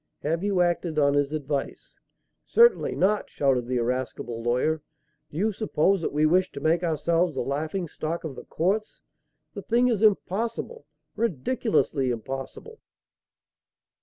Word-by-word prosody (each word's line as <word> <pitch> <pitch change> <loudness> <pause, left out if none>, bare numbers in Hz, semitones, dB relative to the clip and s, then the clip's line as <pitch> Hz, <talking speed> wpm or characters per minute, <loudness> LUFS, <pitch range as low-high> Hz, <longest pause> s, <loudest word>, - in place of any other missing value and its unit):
Have 165 +4 -1
you 200 -3 +2
acted 175 -2 0
on 140 -1 +4
his 145 0 +1
advice?" 145 -2 -4 0.5
"Certainly 470 +1 +4
not!" 205 +2 +1
shouted 130 -4 +1
the 125 0 0
irascible 120 -1 -3
lawyer. 125 +7 0 0.5
"Do 150 - -9
you 215 +5 +1
suppose 195 -3 +1
that - - -2
we 150 +1 +2
wish 180 +4 +3
to - - -6
make 160 +4 +2
ourselves 170 0 +1
the - - -1
laughing 155 +6 -2
stock 160 +2 -4
of 155 -5 -5
the - - -10
courts? 200 +6 -1 0.5
The - - -6
thing 240 +1 +2
is 220 -4 0
impossible 225 - 0 0.3
ridiculously 200 - 0
impossible!" 135 - -6
160 Hz, 140 wpm, -26 LUFS, 140-200 Hz, 0.5 s, on